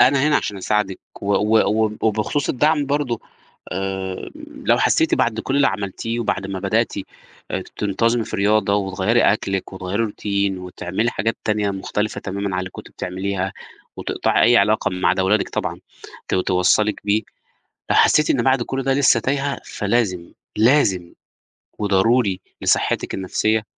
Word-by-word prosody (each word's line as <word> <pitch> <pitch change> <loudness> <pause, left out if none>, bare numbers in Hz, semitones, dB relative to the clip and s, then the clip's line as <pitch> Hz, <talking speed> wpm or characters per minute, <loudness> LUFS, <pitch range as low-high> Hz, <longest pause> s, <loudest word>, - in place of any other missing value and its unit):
أنا 130 +2 +5
هنا 150 - +4
عشان 105 - -2
أساعدِك، 100 0 -1 0.2
و - - -5
و 110 0 +3
وب 110 0 -4
وبخصوص 110 +6 0
الدعم 150 +2 +2
برضه 140 -5 -1 0.5
آآ، 95 0 -4 0.3
لو - - +4
حسّيتِ - - +3
بعد 110 -1 0
كلّ 135 +4 -2
اللي 140 -1 +4
عملتيه 105 +4 -3
وبعد 100 -3 -1
ما 95 -1 -4
بدأتِ 110 +5 0 0.6
آآ، - - -2
تنتظمي 115 +3 +1
في - - -5
رياضة 100 0 +2
وتغيّري 100 +3 +1
أكلِك 95 -2 0
وتغيّري 95 +4 -2
routine 100 -2 -1
وتعملي 90 +5 -2
حاجات 110 +3 -1
تانية 105 -1 +1
مختلفة 105 +2 -3
تمامًا 100 0 -3
عن - - -1
اللي 95 - -6
كنتِ - - -11
بتعمليها، 95 +1 -3 0.4
وتقطعي - - 0
أي 120 - +6
علاقة 105 0 +3
ما 90 -1 0
عدا 95 - +2
ولادِك 105 +3 +2
طبعًا - - -3 0.5
ت - - 0
توصّلِك 95 +3 +2
بيه، 105 +2 +2 0.7
لو - - +3
حسّيتِ 150 - +4
إن 130 - +3
بعد 130 -1 +3
كلّ 135 +2 -3
ده 135 +1 +2
لسّه 135 -4 +4
تايهة 140 +3 -1
فلازم، 100 -5 -1 0.2
لازم 105 -8 +3 0.7
وضروري 100 0 +2 0.2
لصحتِك - - +1
النفسية، 110 +3 0
105 Hz, 150 wpm, -21 LUFS, 95-115 Hz, 0.7 s, أي